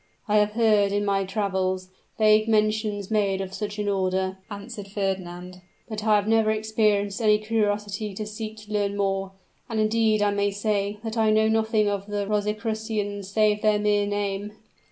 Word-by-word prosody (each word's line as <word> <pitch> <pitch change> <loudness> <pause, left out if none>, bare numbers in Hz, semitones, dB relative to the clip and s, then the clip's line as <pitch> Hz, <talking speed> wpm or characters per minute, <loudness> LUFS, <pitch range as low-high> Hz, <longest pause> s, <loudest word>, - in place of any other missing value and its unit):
"I 210 0 +3
have 210 0 +2
heard, 215 -3 +3
in 205 0 0
my 195 -1 +1
travels, 190 -2 -1 0.3
vague 215 0 +4
mention 215 -1 +1
made 200 -3 +1
of 190 -1 -5
such 205 0 -4
an 210 -1 -2
order," 190 -1 0
answered 205 0 -7
Fernand; 185 -2 -4 0.3
"but 215 -2 -5
I 215 -1 +4
never 220 +1 +2
experienced 215 -1 +1
any 210 -1 +5
curiosity 210 -1 -1
to 215 - -4
seek 215 +1 -6
to 210 0 -9
learn 205 -1 0
more 195 -1 -1 0.4
and, 225 -2 -2
indeed, 215 -1 +2
I 205 - +2
may 200 0 +1
say, 205 0 -1
that 225 0 -3
I 220 -1 +3
know 215 0 +4
nothing 220 -1 +2
of 200 -1 -2
the 205 -1 -2
Rosicrucians 210 -1 -2
save 210 0 +2
their 215 -1 +3
mere 205 -1 +1
name." 205 0 -2
210 Hz, 170 wpm, -25 LUFS, 200-215 Hz, 0.4 s, any